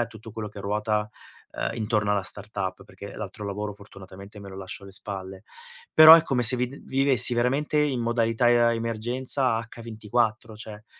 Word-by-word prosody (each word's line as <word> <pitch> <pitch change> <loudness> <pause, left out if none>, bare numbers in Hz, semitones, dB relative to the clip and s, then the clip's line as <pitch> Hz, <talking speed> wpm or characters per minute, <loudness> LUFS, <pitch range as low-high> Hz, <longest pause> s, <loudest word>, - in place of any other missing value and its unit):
a 115 - -3
tutto 110 -1 -13
quello 110 -2 -6
che 100 - -11
ruota, 105 +1 -2 0.4
ehm, - - -3
intorno 105 -2 -1
alla 100 - +1
startup, 100 -1 -5
perché 100 0 -12
l'altro 105 0 -8
lavoro 105 +1 -5
fortunatamente 100 0 -13
me 100 - -11
lo 95 - -10
lascio 95 0 -6
alle 100 0 -12
spalle. 95 -1 -5 0.5
Però 155 +1 +10
è 165 - +5
come 130 -4 -1
se 125 +2 +7
vid 125 +3 -4
vivessi 135 -3 +3
veramente 135 +5 0
in 140 -4 -1
modalità 115 0 0
e 120 -1 +3
emergenza 120 +2 -1
H 115 0 -10
24, 110 0 -2
cioè, 110 0 -9
110 Hz, 175 wpm, -25 LUFS, 100-120 Hz, 0.5 s, Però